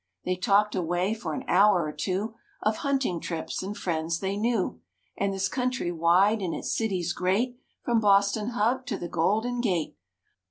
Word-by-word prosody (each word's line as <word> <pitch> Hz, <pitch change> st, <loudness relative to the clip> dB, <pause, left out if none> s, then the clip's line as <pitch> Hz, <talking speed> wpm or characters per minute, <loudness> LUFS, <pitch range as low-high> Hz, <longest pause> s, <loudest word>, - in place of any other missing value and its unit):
They 185 Hz, -, 0 dB
talked 205 Hz, +2 st, +2 dB
away 180 Hz, +3 st, 0 dB
for 225 Hz, +1 st, -4 dB
an 260 Hz, -, -5 dB
hour 195 Hz, -2 st, +5 dB
or 150 Hz, -, -3 dB
two 190 Hz, +8 st, -2 dB, 0.3 s
Of 215 Hz, 0 st, +1 dB
hunting 270 Hz, -11 st, 0 dB
trips 165 Hz, -1 st, -4 dB
and 200 Hz, +2 st, -5 dB
friends 165 Hz, -1 st, -1 dB
they 195 Hz, 0 st, -2 dB
knew. 210 Hz, -, -1 dB, 0.3 s
And 200 Hz, 0 st, 0 dB
this 195 Hz, 0 st, 0 dB
country 250 Hz, -7 st, -1 dB
wide 180 Hz, +6 st, +3 dB
and 180 Hz, -3 st, -2 dB
its -, -, -2 dB
cities 185 Hz, -6 st, -1 dB
great 220 Hz, +9 st, 0 dB, 0.3 s
From 235 Hz, -2 st, +3 dB
Boston 200 Hz, +1 st, +3 dB
Hub 245 Hz, +2 st, 0 dB
to -, -, -2 dB
the 175 Hz, -, -5 dB
Golden 220 Hz, +9 st, 0 dB
Gate. 180 Hz, -9 st, -1 dB
200 Hz, 170 wpm, -27 LUFS, 175-225 Hz, 0.3 s, hour